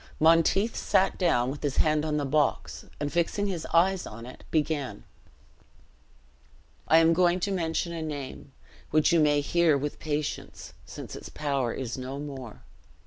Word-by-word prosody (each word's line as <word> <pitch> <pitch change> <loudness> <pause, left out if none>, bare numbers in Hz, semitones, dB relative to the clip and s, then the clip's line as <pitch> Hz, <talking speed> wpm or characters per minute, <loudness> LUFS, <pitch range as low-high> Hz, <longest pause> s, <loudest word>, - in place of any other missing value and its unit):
Monteith 165 +7 +4
sat 190 - +2
down 130 -9 +2
with 145 - -8
his 145 -2 -2
hand 155 -1 +2
on 155 -1 -1
the 145 - -1
box, 145 +1 0
and 145 0 -3
fixing 175 +4 0
his 180 -5 -3
eyes 180 +3 +3
on 115 +2 -9
it, 125 - -12
began: 150 - -1 1.8
"I 160 - +6
am 165 0 +5
going 175 +1 +3
to 200 - -1
mention 170 -2 -1
a 165 - -4
name, 145 -3 -6 0.4
which 155 +1 +3
you 170 - +5
may 145 -1 +3
hear 165 0 +3
with 145 +1 -4
patience, 150 -1 -4
since - - -8
its - - -9
power 140 -5 -1
is 130 0 -5
no 130 +2 -5
more. 135 -6 -8
155 Hz, 160 wpm, -27 LUFS, 140-170 Hz, 1.8 s, I